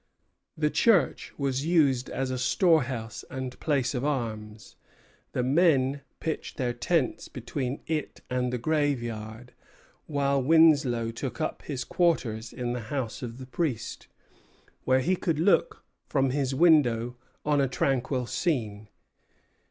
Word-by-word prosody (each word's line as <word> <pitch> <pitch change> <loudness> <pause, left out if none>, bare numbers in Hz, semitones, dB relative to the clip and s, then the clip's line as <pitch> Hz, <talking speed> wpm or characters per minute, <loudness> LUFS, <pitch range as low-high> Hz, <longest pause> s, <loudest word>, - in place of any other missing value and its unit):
The 150 -1 +1
church 195 - +2
was 135 -1 -1
used 145 -7 +2
as 130 0 -2
a 130 - -2
storehouse 130 - +1
and 130 -1 -6
place 140 -5 0
of 125 -1 -2
arms; 110 -7 -4 0.6
the 125 - 0
men 140 -1 +3 0.2
pitched 160 -1 -4
their 125 -3 -1
tents 130 +4 0
between 130 +2 -4
it 155 -2 -3
and 125 0 -1
the 125 - -1
graveyard; 120 -5 -2 0.5
while 140 -2 +1
Winslow 140 -6 +4
took 120 +3 -5
up 155 - -2
his 135 -4 -4
quarters 120 -11 0
in 120 -1 -3
the 125 - -3
house 130 -6 -3
of 120 -2 -6
the 130 - -8
priest, 130 -4 -3 0.8
where 130 0 +3
he 180 +8 +2
could 165 -3 -1
look 200 - +2 0.2
from 135 -2 +1
his 135 -1 -1
window 125 -7 +4 0.3
on 145 -1 +3
a 135 - +2
tranquil 130 0 0
scene. 110 - -2
130 Hz, 135 wpm, -27 LUFS, 120-150 Hz, 0.8 s, Winslow